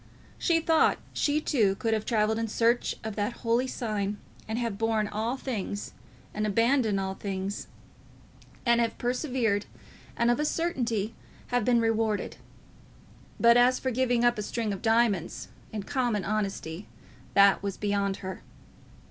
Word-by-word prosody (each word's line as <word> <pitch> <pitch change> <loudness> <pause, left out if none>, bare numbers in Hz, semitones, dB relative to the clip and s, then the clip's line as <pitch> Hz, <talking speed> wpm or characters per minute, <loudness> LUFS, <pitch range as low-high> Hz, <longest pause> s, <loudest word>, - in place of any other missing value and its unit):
She 335 -2 +3
thought 325 0 +3 0.2
she 295 +1 +1
too 220 -11 +2
could 225 +3 -1
have 215 -1 -1
travelled 220 -1 +1
in 230 - -1
search 230 +2 +1
of 220 -2 -4
that 210 +3 -1
holy 235 +3 +2
sign, 210 -5 -2 0.3
and 220 +1 -2
have 230 -4 -2
borne 225 -2 +1
all 220 +5 -2
things, 210 -6 -4 0.4
and 215 0 -1
abandoned 230 0 +2
all 190 0 -2
things, 195 0 -4 1.0
and 235 -1 +4
have 230 -1 -1
persevered, 245 -5 0 0.5
and 235 +1 +3
of 240 - 0
a 300 - +1
certainty 240 - -1 0.4
have 245 -2 +1
been 240 +1 +3
rewarded. 225 -2 0 1.0
But 235 0 +6
as 250 +1 +5
for 260 - -2
giving 245 -1 +2
up 240 -2 +3
a - - 0
string 215 0 -2
of 195 - -6
diamonds, 225 -6 +1 0.2
in 210 -2 -4
common 235 -4 -1
honesty, 195 -4 -3 0.5
that 200 0 +6
was 200 -2 -3
beyond 200 -1 0
her. 190 0 -5
225 Hz, 150 wpm, -28 LUFS, 205-240 Hz, 1.0 s, But